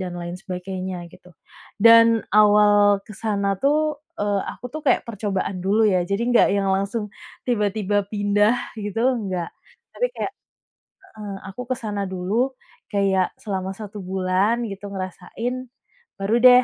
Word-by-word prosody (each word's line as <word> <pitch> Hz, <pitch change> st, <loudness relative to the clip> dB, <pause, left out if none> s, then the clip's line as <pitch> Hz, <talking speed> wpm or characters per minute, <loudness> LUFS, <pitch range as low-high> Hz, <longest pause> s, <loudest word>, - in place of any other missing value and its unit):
dan 185 Hz, -1 st, -4 dB
lain 175 Hz, 0 st, -5 dB
sebagainya 185 Hz, 0 st, -5 dB, 0.2 s
gitu, 180 Hz, -, -17 dB, 0.5 s
dan 230 Hz, 0 st, +9 dB, 0.3 s
awal 205 Hz, -1 st, +6 dB
ke -, -, -10 dB
sana 200 Hz, -1 st, -1 dB
tuh, 300 Hz, +1 st, +1 dB, 0.2 s
eee, 205 Hz, -1 st, +1 dB
aku -, -, -13 dB
tuh 310 Hz, -, -5 dB
kayak 255 Hz, -, +4 dB
percobaan 200 Hz, -3 st, -2 dB
dulu 205 Hz, +3 st, +3 dB
ya 180 Hz, -, +3 dB
jadi 200 Hz, +3 st, 0 dB
nggak 245 Hz, -, +5 dB
yang 200 Hz, -1 st, 0 dB
langsung 200 Hz, +3 st, -2 dB, 0.4 s
tiba-tiba 210 Hz, -3 st, 0 dB, 0.2 s
pindah 205 Hz, +2 st, +3 dB, 0.3 s
gitu 205 Hz, +2 st, -3 dB, 0.2 s
enggak 185 Hz, -5 st, -3 dB, 0.5 s
tapi -, -, +1 dB
kayak -, -, -3 dB, 0.9 s
heeh, 205 Hz, -2 st, -6 dB, 0.2 s
aku 220 Hz, -, -7 dB
ke -, -, +2 dB
sana 205 Hz, -2 st, -2 dB
dulu 185 Hz, +2 st, -3 dB, 0.6 s
kayak 195 Hz, -2 st, +2 dB, 0.2 s
selama 190 Hz, -3 st, -3 dB
1 210 Hz, -1 st, -8 dB
bulan 190 Hz, +3 st, +1 dB, 0.2 s
gitu 195 Hz, +1 st, -8 dB
ngerasain 190 Hz, +6 st, -4 dB, 0.6 s
baru 195 Hz, +2 st, -1 dB
deh 250 Hz, 0 st, +9 dB
205 Hz, 140 wpm, -23 LUFS, 190-220 Hz, 0.9 s, dan